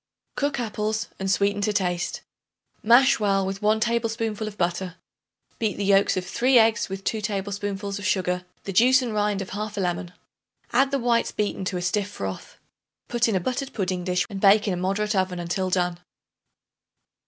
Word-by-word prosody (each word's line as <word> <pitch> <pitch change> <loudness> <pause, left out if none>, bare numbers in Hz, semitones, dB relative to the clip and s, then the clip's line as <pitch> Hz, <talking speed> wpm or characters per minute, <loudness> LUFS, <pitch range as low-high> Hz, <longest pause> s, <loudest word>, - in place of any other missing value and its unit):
Cook 285 -3 -1
apples 215 -1 -2
and 190 0 -2
sweeten 200 +1 +1
to 210 +1 +1
taste. 180 -3 -1 0.6
Mash 240 +4 +5
well 195 -2 +2
with 195 +1 -4
1 215 +1 +3
tablespoonful 225 -2 -1
of 210 -1 -8
butter. 180 0 -1 0.6
Beat 220 -2 -1
the 200 - -2
yolks 195 -1 +4
of 180 - -2
3 250 +7 +3
eggs 225 -2 +3
with 195 0 -6
2 220 +2 -1
tablespoonfuls 200 0 -3
of 200 - -7
sugar, 180 -1 0 0.2
the 195 - -5
juice 255 +6 +5
and 235 -3 -3
rind 205 -2 0
of 185 - -11
1/2 210 +1 -4
lemon; 175 -1 -2 0.6
add 265 +3 +4
the 275 - 0
whites 235 -2 +1
beaten 205 -2 -2
to 185 0 -2
a 175 - -4
stiff 200 +3 0
froth. 95 - -6 0.5
Put 240 -1 +2
in 220 - 0
a - - +3
buttered 255 +8 -3
pudding 185 -3 -2
dish 180 0 0
and 195 -3 -7
bake 205 +1 +5
in 195 - +1
a - - -2
moderate 200 +4 -1
oven 185 -1 0
until 175 +2 -2
done. 180 -1 0
200 Hz, 185 wpm, -24 LUFS, 185-220 Hz, 0.6 s, Mash